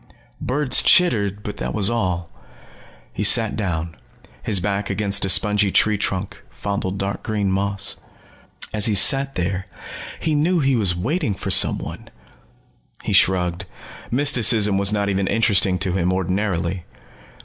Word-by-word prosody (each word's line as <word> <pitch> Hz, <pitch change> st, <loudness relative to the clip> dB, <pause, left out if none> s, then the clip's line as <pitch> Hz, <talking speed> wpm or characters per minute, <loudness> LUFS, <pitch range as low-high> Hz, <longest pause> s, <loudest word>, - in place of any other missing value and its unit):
Birds 130 Hz, 0 st, +2 dB
chittered, 105 Hz, -, +2 dB
but 105 Hz, -1 st, -6 dB
that -, -, -4 dB
was 100 Hz, -3 st, +2 dB
all. 90 Hz, -7 st, -2 dB, 0.9 s
He -, -, -3 dB
sat 110 Hz, +1 st, +2 dB
down, 85 Hz, -5 st, -4 dB, 0.5 s
his 100 Hz, -4 st, -1 dB
back 100 Hz, +1 st, -3 dB
against 100 Hz, 0 st, +1 dB
a -, -, -2 dB
spongy 105 Hz, 0 st, +2 dB
tree 105 Hz, +2 st, +3 dB
trunk, 95 Hz, -1 st, -4 dB
fondled 100 Hz, -1 st, -4 dB
dark 100 Hz, 0 st, -4 dB
green 105 Hz, -3 st, -2 dB
moss. 100 Hz, 0 st, -3 dB, 0.8 s
As 105 Hz, 0 st, +3 dB
he 105 Hz, -, +1 dB
sat 135 Hz, +7 st, +3 dB
there, 95 Hz, +1 st, -3 dB, 0.5 s
he 160 Hz, -, -1 dB
knew 165 Hz, +4 st, +1 dB
that -, -, -1 dB
he 135 Hz, -1 st, +2 dB
was 100 Hz, -6 st, 0 dB
waiting 120 Hz, -, -2 dB
for -, -, -4 dB
someone. -, -, +1 dB, 0.9 s
He -, -, -3 dB
shrugged. 90 Hz, -2 st, +2 dB, 0.4 s
Mysticism 115 Hz, -6 st, +3 dB
was 100 Hz, +1 st, +3 dB
not 100 Hz, -1 st, -1 dB
even 100 Hz, -1 st, -1 dB
interesting 100 Hz, -4 st, +2 dB
to 90 Hz, +1 st, -1 dB
him, 90 Hz, -1 st, 0 dB
ordinarily. 95 Hz, -1 st, -2 dB
100 Hz, 145 wpm, -20 LUFS, 95-110 Hz, 0.9 s, tree